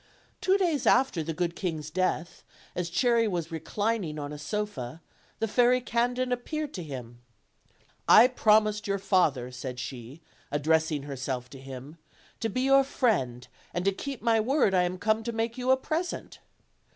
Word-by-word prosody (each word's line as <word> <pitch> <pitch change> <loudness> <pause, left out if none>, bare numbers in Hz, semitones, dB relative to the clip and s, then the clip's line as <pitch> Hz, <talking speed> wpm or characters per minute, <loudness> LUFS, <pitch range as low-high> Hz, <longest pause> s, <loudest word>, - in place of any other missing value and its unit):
Two 380 +1 +3
days 335 -8 0
after 260 -11 +4
the 160 +1 -3
good 170 +1 -2
king's 160 -5 -4
death, 180 -1 -1 0.3
as 175 -1 -3
Cherry 230 +5 +3
was 170 -4 -3
reclining 195 0 -2
on 145 0 -5
a 150 - -7
sofa, 160 - -4 0.4
the 225 - -1
Fairy 245 +3 +4
Candid 245 +1 0
appeared 295 +4 -3
to 185 - -5
him. 125 -6 -8 0.9
"I 240 - +9
promised 215 -3 +3
your 200 0 +1
father/' 155 -11 +1
said 125 0 -6
she, 130 +5 -8 0.3
addressing 155 0 +1
herself 130 -3 -4
to 135 - -10
him, 135 +4 -9 0.4
"to 225 - -1
be 255 +5 -1
your 270 +1 +5
friend; 155 - 0 0.3
and 175 +1 -1
to 195 - +4
keep 265 +4 -6
my 230 -1 +3
word 245 -2 +2
I 180 -1 +4
am 180 +1 -3
come 215 +3 +1
to 235 - -3
make 225 +1 -2
you 255 0 -3
a 260 - +6
present." 320 +6 -4
190 Hz, 165 wpm, -28 LUFS, 150-240 Hz, 0.9 s, I